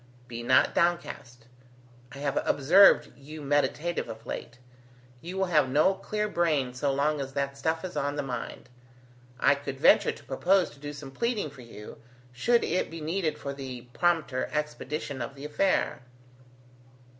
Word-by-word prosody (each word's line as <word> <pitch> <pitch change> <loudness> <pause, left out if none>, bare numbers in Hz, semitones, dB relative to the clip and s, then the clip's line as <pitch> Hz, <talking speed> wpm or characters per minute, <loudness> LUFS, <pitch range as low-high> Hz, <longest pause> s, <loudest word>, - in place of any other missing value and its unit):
Be 120 -1 -6
not 130 +2 +4
downcast. 170 -9 -1 0.7
I 140 - -10
have 140 0 -1
observed 180 +9 +5
you 150 +3 -10
meditative 145 +2 0
of 115 0 -9
late. 120 - -6 0.6
You 180 +3 -6
will 190 - +2
have 155 -7 +2
no 150 +8 +4
clear 210 +2 -3
brain 155 -10 0
so 135 +2 0
long 145 +2 0
as 135 0 -6
that 140 0 -2
stuff 160 +5 -1
is 185 - -7
on 145 +1 -1
the 145 - -2
mind. 130 -2 -6 0.7
I - - +5
could 140 -1 -6
venture - - +5
to - - -13
propose 180 +7 +2
to - - -17
do 145 +1 -6
some 145 -2 -9
pleading 215 - -1
for 135 - -13
you, 110 -3 -11 0.3
should 235 - +2
it 180 - 0
be 165 - -7
needed 160 0 -1
for 140 - -5
the 130 -3 -7
prompter 165 -7 0
expedition 150 -1 -3
of 140 - -5
the 140 +1 -9
affair." 150 0 0
145 Hz, 165 wpm, -28 LUFS, 135-170 Hz, 0.7 s, observed